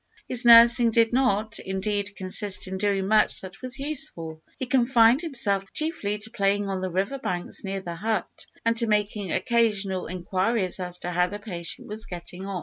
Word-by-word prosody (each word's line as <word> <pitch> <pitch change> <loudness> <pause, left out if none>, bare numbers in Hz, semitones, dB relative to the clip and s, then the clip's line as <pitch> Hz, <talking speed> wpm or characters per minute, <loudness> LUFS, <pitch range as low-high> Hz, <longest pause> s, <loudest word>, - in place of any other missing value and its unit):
His 245 0 +1
nursing 235 0 +8
did 230 0 +2
not, 220 -4 +1
indeed, 200 +1 -3
consist 190 +1 -1
in 190 0 -5
doing 195 -1 0
much 215 +1 +3
that 190 +2 -11
was 255 0 -5
useful. 170 - -4 0.2
He 260 - -3
confined 245 0 +4
himself 205 - 0
chiefly 310 - -2
to 215 +2 -11
playing 200 -2 0
on 190 -1 -2
the 185 - -2
river 195 +10 -2
banks 180 -9 -4
near 195 -1 -3
the 175 -2 -6
hut, 210 +2 -3 0.2
and 230 0 +2
to 230 0 0
making 210 -3 0
occasional 210 -6 0
inquiries 185 +3 -1
as 180 -1 -4
to 180 - -2
how 180 +1 +2
the 205 +3 -6
patient 175 -6 -6
was 215 +2 -3
getting 180 +2 -8
on. 195 -2 -3
205 Hz, 180 wpm, -25 LUFS, 190-230 Hz, 0.2 s, nursing